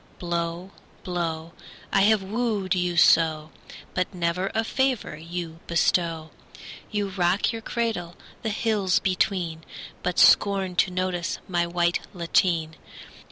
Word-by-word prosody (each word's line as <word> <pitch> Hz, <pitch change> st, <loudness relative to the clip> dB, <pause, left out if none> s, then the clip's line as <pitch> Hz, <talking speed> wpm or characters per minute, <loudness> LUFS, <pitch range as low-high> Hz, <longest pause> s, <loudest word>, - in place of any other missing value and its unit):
Blow, 170 Hz, +1 st, -3 dB, 0.3 s
blow! 170 Hz, -2 st, -3 dB, 0.4 s
I 195 Hz, -, +4 dB
have 210 Hz, 0 st, +4 dB
wooed 210 Hz, -2 st, -1 dB
you 180 Hz, -2 st, -1 dB
so, 160 Hz, -2 st, +4 dB, 0.4 s
But 180 Hz, -, -1 dB
never 175 Hz, +2 st, -1 dB
a 225 Hz, -, +2 dB
favour 260 Hz, -, -1 dB
you 165 Hz, +1 st, -6 dB
bestow. 165 Hz, -1 st, +1 dB, 0.6 s
You 205 Hz, -2 st, -2 dB
rock 185 Hz, +2 st, +1 dB
your 225 Hz, -, -5 dB
cradle 220 Hz, -8 st, -3 dB, 0.3 s
the 220 Hz, -, -2 dB
hills 210 Hz, -4 st, +1 dB
between, 180 Hz, -3 st, 0 dB, 0.4 s
But 180 Hz, -, -2 dB
scorn 195 Hz, -3 st, +4 dB
to 195 Hz, -, +4 dB
notice 180 Hz, -1 st, -2 dB
my 175 Hz, -2 st, 0 dB
white 175 Hz, 0 st, +1 dB, 0.2 s
lateen. 165 Hz, -2 st, +1 dB
180 Hz, 120 wpm, -25 LUFS, 170-195 Hz, 0.6 s, I